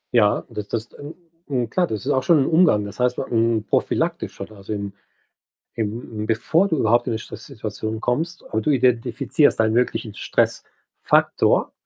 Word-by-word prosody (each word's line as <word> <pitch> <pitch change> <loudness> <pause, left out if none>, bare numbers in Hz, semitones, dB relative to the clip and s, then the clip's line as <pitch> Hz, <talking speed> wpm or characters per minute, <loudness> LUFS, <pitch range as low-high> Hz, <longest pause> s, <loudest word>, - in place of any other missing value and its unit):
Ja, 105 -3 +3
das 105 -1 -6
das 115 0 -4
n 145 +2 -9 0.3
n 125 -5 -1
klar, 180 -1 +1
das 110 -2 -5
ist 145 - +1
auch 130 - +2
schon 150 0 +4
im - - -2
Umgang. 160 - +4
Das 100 +2 -9
heißt, 125 0 +1
hm, 115 -3 +1
prophylaktisch - - -1
oder 110 - -8
also, 100 +2 -9
im 100 -2 -4 0.8
im 110 0 -4
bevor 125 - +2
du 160 - 0
überhaupt 120 -1 +2
in - - 0
'ne - - -1
Stresssituation 110 -3 -6
kommst 160 +9 -2
aber 110 - 0
du 110 - +1
identifizierst 125 +3 +2
deinen 110 -1 +2
möglichen 120 -2 0
Stressfaktor - - 0
115 Hz, 165 wpm, -22 LUFS, 110-135 Hz, 0.8 s, schon